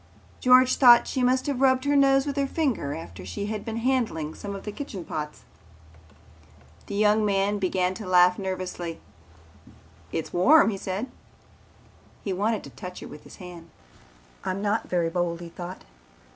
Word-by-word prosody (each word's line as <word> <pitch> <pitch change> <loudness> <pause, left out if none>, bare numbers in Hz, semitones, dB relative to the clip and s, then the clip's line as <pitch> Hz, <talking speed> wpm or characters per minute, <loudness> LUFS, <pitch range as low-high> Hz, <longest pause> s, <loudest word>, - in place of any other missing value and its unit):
George 255 0 +5
thought 240 -3 +7
she 260 - -2
must 255 +1 +2
have 280 -3 -2
rubbed 260 0 +3
her 285 0 +2
nose 270 -1 +4
with 285 -2 -3
her 280 -1 0
finger 265 - -1
after 90 - -9
she 90 - -5
had 210 0 -4
been 225 0 -5
handling 230 -11 -1
some 200 -1 -7
of 195 - -8
the 210 - -5
kitchen 205 - -7
pots. 150 -1 -6 1.4
The - - -5
young 210 +1 +3
man 200 0 +1
began 185 -1 0
to 205 0 -8
laugh 180 0 +5
nervously. 185 -3 -4 1.1
"It's 165 - -4
warm," 235 - +5
he 195 - -4
said. 190 +4 -3 1.2
He 195 - -2
wanted 210 +3 -1
to - - -11
touch 180 -2 -9
her - - -8
with 150 - -12
his - - -13
hand. 175 -3 -11 0.7
"I'm 185 +1 -2
not 210 +2 -1
very 170 -2 0
bold," 170 -1 -1
he 170 -1 -8
thought. 175 +2 -8
200 Hz, 170 wpm, -26 LUFS, 180-250 Hz, 1.4 s, thought